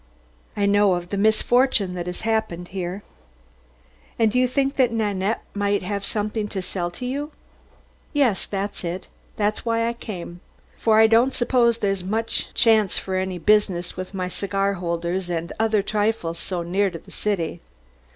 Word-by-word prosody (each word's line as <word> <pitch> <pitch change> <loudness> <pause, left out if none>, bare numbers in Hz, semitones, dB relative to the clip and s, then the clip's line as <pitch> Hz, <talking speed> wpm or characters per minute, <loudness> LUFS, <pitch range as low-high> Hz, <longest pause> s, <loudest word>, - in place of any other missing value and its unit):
"I 205 - +2
know 200 -2 +4
of 175 0 -5
the 200 - -2
misfortune 220 -1 +3
that 175 -1 -4
has 180 - -4
happened 220 -6 -1
here." 185 +1 -4 1.1
"And 225 -2 +3
you 250 0 +3
think 270 +2 0
that 255 -3 +4
Nanette 210 -2 -1
might 205 -1 0
have 200 +1 -3
something 215 0 -2
to 200 - -4
sell 180 -1 -2
to 250 +8 -7
you?" 285 +4 -3 0.8
"Yes, 265 -9 +1
that's 200 0 -4
it; 175 +2 -4 0.3
that's 210 0 0
why 230 0 +1
I 235 - -1
came. 180 -7 -7 0.4
For 220 -1 +3
I 220 - +8
don't 230 +4 +4
suppose 240 -2 +3
there's 195 -4 -1
much 220 +4 -1
chance 220 -4 +4
for 190 - -2
any 185 -1 -1
business 185 -2 +2
with 185 +1 -6
my 185 -1 -2
cigar 195 +1 0
holders 175 0 -2
and 170 -1 -3
other 220 -2 +2
trifles 205 -6 -1
here - - -5
so 180 -2 -2
near 195 +4 +1
the 165 -3 -11
city." 175 -5 -2
205 Hz, 165 wpm, -23 LUFS, 180-225 Hz, 1.1 s, I